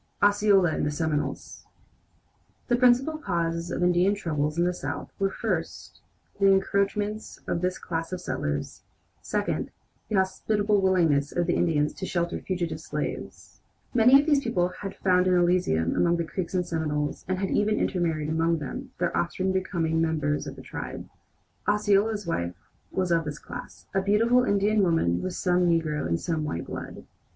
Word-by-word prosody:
OSCEOLA 205 -3 +4
AND - - -1
THE 145 - +1
SEMINOLES 150 -2 -3 1.0
The 240 - +4
principal 255 +5 +3
causes 170 - -2
of 180 - -2
Indian 180 +3 +3
troubles 155 -5 -2
in 170 - +3
the 180 0 +1
South - - -5
were, 195 0 +2
first, - - -4 0.4
the 200 - +5
encroachments 200 +2 0
of 170 - -2
this 180 0 0
class 165 0 -4
of 185 - -3
settlers; 75 - -3 0.4
second, - - -2 0.4
the 215 - 0
hospitable 205 +2 +1
willingness 165 -7 +2
of 175 - 0
the 175 - +1
Indians 150 -3 +1
to 190 - -6
shelter 170 -1 -1
fugitive 180 -3 -3
slaves. - - -6 0.3
Many 250 +3 +7
of 285 - 0
these 290 -3 +3
people 180 -7 +1
had 195 +2 -7
found 180 -1 +2
an 185 - +4
Elysium 175 - +2
among 170 0 +3
the 170 - 0
Creeks 180 +2 -4
and 180 -1 +1
Seminoles, 150 -3 -2
and 185 0 0
had 195 0 -2
even 210 +1 +2
intermarried 165 -5 0
among 165 +1 +1
them, 145 -3 -6
their - - -1
offspring 185 - 0
becoming 170 -4 0
members 155 -2 0
of - - -6
the - - -11
tribe. - - -7 0.6
Osceola's 205 0 +2
wife 85 - -2 0.3
was 185 -2 -1
of 165 -1 +3
this 150 -1 -4
class 245 +7 -9
a 195 - +2
beautiful 230 +5 +3
Indian 205 +1 +2
woman 165 - +2
with 185 - -3
some 180 -1 +2
negro 160 - +1
and 85 0 0
some 160 -3 -2
white 90 - -3
blood. - - -7
180 Hz, 165 wpm, -26 LUFS, 160-200 Hz, 1.0 s, Many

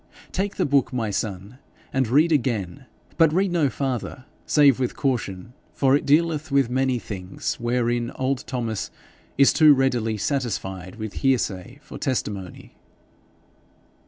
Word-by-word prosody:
Take 200 +2 -2
the - - 0
book, 140 -2 +2
my 115 -5 -2
son, 100 +4 -4 0.3
and 135 -3 +1
read 150 +8 +3
again. 115 - -1 0.3
But 165 -2 +5
read 190 +3 +1
no 160 -5 +2
farther 130 +1 -4 0.2
save 140 -4 +5
with 125 -2 -1
caution, 115 -5 -2 0.2
for 135 -1 +3
it 145 - -1
dealeth 155 +1 +2
with 135 -3 +2
many 130 0 +1
things 95 -5 -5
wherein 120 0 0
old 130 0 -1
Thomas 115 -5 -3 0.5
is 140 0 +5
too 155 -2 +7
readily 120 -5 0
satisfied 95 - -3
with 110 -2 -6
hearsay 125 -4 0
for 135 - -10
testimony.' 105 - -4
125 Hz, 135 wpm, -23 LUFS, 110-140 Hz, 0.5 s, too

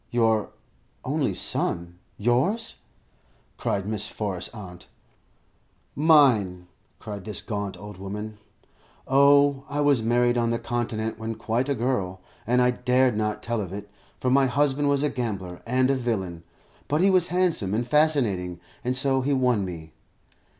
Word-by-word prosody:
"Your 115 -3 +2 0.6
only - - 0
son? 85 0 -2 0.2
Yours?" 135 - 0 0.8
cried 100 -1 -1
Miss 105 0 -3
Forrest's 100 -5 -4
aunt. 90 -5 -11 1.1
"Mine," 125 - +4 0.3
cried 105 -3 -7
this 105 +1 -4
gaunt 100 -4 -4
old 105 +1 -10
woman. 105 +2 -6 0.7
"Oh, 140 0 +5
I 145 +1 -2
was 145 -4 +3
married 120 +1 +2
on 115 -1 +1
the 115 - 0
Continent 115 -2 -3
when 110 0 -4
quite 115 +4 -1
a 140 - +1
girl, 110 -7 -1 0.3
and 125 +1 +3
I 125 - +4
dared 125 -1 +2
not 105 0 -2
tell 115 -1 -1
of 95 -3 -6
it, 100 +1 -8 0.3
for 125 - 0
my 135 0 +4
husband 140 +2 +1
was 140 0 +2
a 150 - +2
gambler 95 -8 -4
and 130 +2 +2
a - - +2
villain; 100 -9 -2 0.5
but 150 +3 +1
he 195 +1 +5
was 180 -2 +4
handsome 165 - +1
and 120 +2 0
fascinating, 120 - +1 0.2
and 125 +1 +1
so 135 0 +2
he 140 +2 0
won 125 -6 +2
me. 80 -4 -7
120 Hz, 150 wpm, -25 LUFS, 105-135 Hz, 1.1 s, Oh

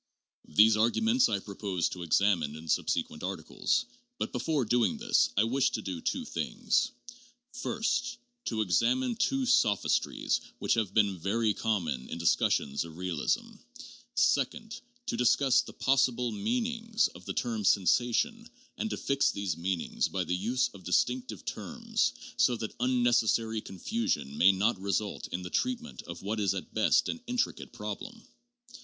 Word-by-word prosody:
These 105 +8 +6
arguments 225 - +3
I - - +1
propose 100 -3 -2
to 90 - -7
examine 85 -3 +2
in 80 +1 -10
subsequent 75 - -1
articles, 95 - -1 0.3
but - - -3
before 150 -6 0
doing 120 - +2
this, 230 +1 +2
I 100 - +5
wish 125 +4 +2
to 110 - -2
do 90 -4 -4
two - - -2
things: - - 0 0.6
first, 230 0 -1 0.3
to 110 -2 -1
examine 240 - +2
two 270 +3 +1
sophistries 105 - +2 0.2
that - - +1
have 110 -5 -1
been 100 -4 +3
very 105 +5 +1
common 85 - -2
in - - -4
discussions 75 -4 +1
of 80 -1 -11
real 90 -4 -3
ism; - - -1 0.6
second, 145 - +1 0.2
to - - -1
study 130 +1 +3
the - - -9
possible 125 -2 +2
meanings 230 - 0
of 90 +1 -14
the 95 - -3
term 115 -3 -1
'sensation' 125 - +2 0.3
and 220 - -1
to - - -3
fix 140 0 +1
these 100 -5 -2
meanings 90 +1 -1
by 95 -1 -2
the 90 - -1
use 120 +7 0
of 100 - -14
distinctive 120 +3 0
terms, - - -1 0.2
so 125 - +4
that 110 -2 -5
unnecessary 120 -3 +2
confusion 95 - -2
may 95 +6 +6
not 100 +3 +1
result 100 +1 -2
in 90 +1 -4
the 90 - -7
treatment 245 - -2
of 85 +1 -8
what 105 +2 -2
is 100 -1 +1
at 95 - -6
best 110 - +3
an 245 - -4
intricate 245 0 -2
problem. - - -7
110 Hz, 150 wpm, -30 LUFS, 95-140 Hz, 0.6 s, These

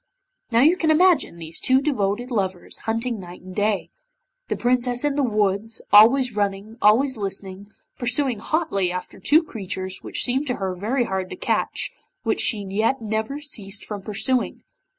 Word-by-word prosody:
Now 230 0 +3
you 320 +6 +5
can 320 -3 +1
imagine 320 - +4
these 165 0 -7
two 260 0 +3
devoted 245 -4 -1
lovers 190 -5 -3
hunting 230 0 -1
night 180 -1 -10
and 185 0 -10
day. 210 -1 0 0.6
The - - -1
Princess 245 +1 +1
in 290 -1 +1
the 290 - +1
woods, 215 -2 0
always 235 +3 +7
running, 205 +2 -2
always 245 +5 +4
listening, 195 0 -6 0.3
pursuing 250 -1 0
hotly 200 - 0
after 180 0 -6
two 315 +3 +4
creatures 190 - -5
which - - -1
seemed 265 +4 +1
to 250 - 0
her 190 -1 -3
very 225 +8 0
hard 190 -4 -3
to - - -6
catch, - - -1 0.3
which - - +1
she 205 -4 +1
yet 220 +7 +1
never 220 +5 -2
ceased 205 -9 -5
from 205 -2 -6
pursuing. 235 +5 -1
220 Hz, 165 wpm, -23 LUFS, 195-260 Hz, 0.6 s, always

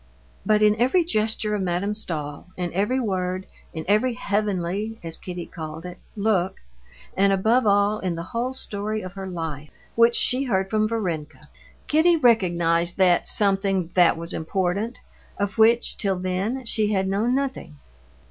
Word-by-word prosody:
But 215 0 +4
in 210 0 +5
every 260 +10 +3
gesture 215 -5 -1
of 210 - -1
Madame 185 +3 -1
Stahl, 155 -8 -4
in 175 -2 -3
every 210 +8 +1
word, 185 -4 -2 0.3
in 160 -2 -6
every 215 +5 +2
heavenly—as 205 -4 -2
Kitty 180 -2 -6
called 160 0 -8
it—look, 190 +1 -2 0.6
and 195 +1 +3
above 220 +5 +2
all 205 +1 +3
in 180 -2 -2
the 165 - -5
whole 245 +3 -2
story 215 -2 -4
of 185 - -6
her 195 -1 -6
life, 160 -5 -5 0.2
which 230 +1 +4
she 255 +2 +2
heard 190 -5 0
from 215 0 +2
Varenka, 170 -9 -4 0.4
Kitty 325 +3 +4
recognized 175 - +2
that 180 -2 +4
something 195 -3 +2
"that 175 -2 +4
was 170 +1 -6
important," 190 +7 -2 0.4
of 200 +1 -3
which, 230 +2 +4
till 195 -3 0
then, 190 +8 -2
she 215 -2 0
had 190 -2 +1
known 215 +6 +1
nothing. 270 - -3
200 Hz, 150 wpm, -24 LUFS, 180-220 Hz, 0.6 s, in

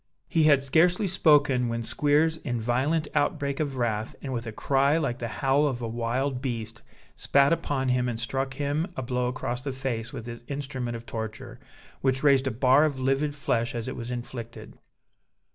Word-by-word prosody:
He 160 -3 +2
had 140 -3 +5
scarcely 175 +8 +3
spoken, 145 -8 +3
when 115 0 -2
Squeers 150 +6 +2
in 125 -6 -3
a - - -4
violent 135 +7 +1
outbreak 140 -1 0
of 140 -4 -2
wrath, 110 -3 -1
and 135 -2 -4
with 115 -1 -4
a - - -4
cry 140 +6 +2
like 135 -7 -1
the 120 - -3
howl 135 +5 +2
of 130 -4 -2
a 115 - -3
wild 125 +3 -1
beast, 115 -3 -4 0.3
spat 140 +2 +3
upon 135 -5 -1
him 125 0 +1
and 115 -2 -4
struck 135 +2 -2
him 145 +4 -1
a 130 - -2
blow 125 0 -1
across 125 0 -3
the 135 +1 -3
face 125 -4 -3
with 115 - -7
his 120 0 -8
instrument 135 -4 -4
of 115 - -12
torture, 110 -1 -6 0.4
which 130 0 +1
raised 135 -2 +4
a - - +3
bar 130 +4 +4
of 145 -4 0
livid 135 +3 0
flesh 120 -4 -1
as 115 0 -4
it 130 - -4
was 120 0 -6
inflicted. 120 -1 -7
130 Hz, 195 wpm, -27 LUFS, 120-145 Hz, 0.4 s, had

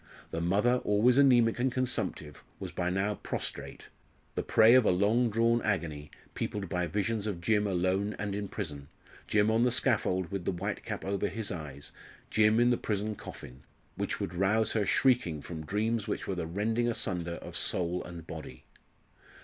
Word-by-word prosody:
The 80 - -2
mother, 105 +8 +3
always 115 +6 +4
anaemic 120 -5 +5
and 130 +1 +1
consumptive, 120 - -2 0.2
was - - -6
by 90 - -1
now 95 +3 0
prostrate, - - -5 0.4
the - - -1
prey 110 +1 +5
of 130 -1 +7
a - - +3
long 105 +6 +3
drawn 115 +2 +2
agony, 80 -8 -2 0.2
peopled 100 -2 -3
by 90 0 -1
visions 105 +4 -1
of 100 -5 -3
Jim 105 +3 +2
alone 95 +2 0
and 100 -1 -3
in 100 0 -3
prison 75 -9 -5 0.4
Jim 105 +1 +3
on 110 +1 +3
the 125 - +4
scaffold 105 -8 +1
with 100 -2 -3
the - - +1
white 100 +4 -4
cap 105 -3 -5
over 100 +1 0
his 110 0 -4
eyes 75 -5 -7 0.4
Jim 110 +1 +4
in 120 +1 +4
the 120 - +2
prison 105 0 -2
coffin 65 -9 -10 0.3
which - - -3
would 85 - -3
rouse 100 +5 +2
her 105 -3 0
shrieking 115 - +2
from 80 0 -7
dreams 110 +1 0
which - - -3
were 95 - -2
the 90 -3 -3
rending 110 +7 0
asunder 90 -7 -2
of - - -9
soul 90 0 -1
and 85 -2 -9
body. 80 -1 -9
100 Hz, 180 wpm, -30 LUFS, 90-115 Hz, 0.4 s, of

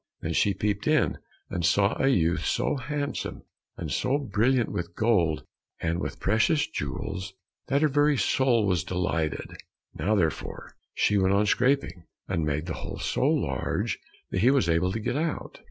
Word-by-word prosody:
Then 80 - -2
she 100 +3 +2
peeped 100 +1 -1
in, - - +2 0.3
and 90 - -2
saw 100 +5 +3
a 135 - +3
youth 85 -10 +2
so - - 0
handsome, 145 +2 -4 0.3
and - - -5
so 135 - +1
brilliant 125 -2 +1
with 85 0 -4
gold 90 -9 +2 0.4
and 85 +1 -1
with - - -4
precious 115 - +2
jewels, 95 +8 -5 0.3
that 140 +2 +2
her - - +6
very 145 0 +3
soul 125 -5 +2
was 90 -4 +1
delighted. 90 -4 -2 0.4
Now, 95 +8 0
therefore, 80 -6 -2 0.2
she 105 -1 +3
went 95 +1 +3
on 105 +1 +3
scraping, 120 -7 +1 0.2
and 90 -4 -1
made 75 +1 -1
the 85 - -3
hole - - -6
so - - 0
large - - 0 0.3
that 95 - 0
he 120 - +6
was 135 -10 +3
able 85 +2 +2
to 115 - -2
get 115 +5 -2
out. 160 +1 -3
100 Hz, 170 wpm, -27 LUFS, 85-130 Hz, 0.4 s, her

